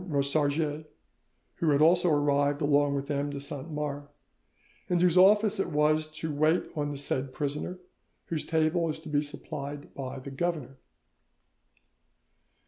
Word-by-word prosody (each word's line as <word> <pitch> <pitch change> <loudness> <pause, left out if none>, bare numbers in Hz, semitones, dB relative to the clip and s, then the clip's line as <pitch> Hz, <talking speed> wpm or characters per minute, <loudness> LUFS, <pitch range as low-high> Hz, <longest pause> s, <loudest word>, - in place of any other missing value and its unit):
Rosarges, 145 +1 0 0.7
who 165 - +1
had 140 -1 +3
also 175 +3 +5
arrived 145 -1 +2
along 145 0 +3
with 140 +1 -3
M. 145 0 -1
de 140 -1 -5
Saint 140 +2 -5
Mars, 145 -2 -4 0.8
and 175 - +2
whose 175 -1 +3
office 205 +2 +5
it 195 - 0
was 155 0 +2
to 155 0 -5
wait 155 +4 +2
on 145 -1 -1
the 145 - -5
said 135 -1 -1
prisoner, 150 +6 -3 0.5
whose 160 -3 -2
table 160 +1 +1
is 155 - -4
to 155 - -9
be 145 -1 +2
supplied 145 0 -7
by 135 -1 -6
the 135 +1 -8
governor." 140 -3 -3
150 Hz, 145 wpm, -28 LUFS, 140-160 Hz, 0.8 s, also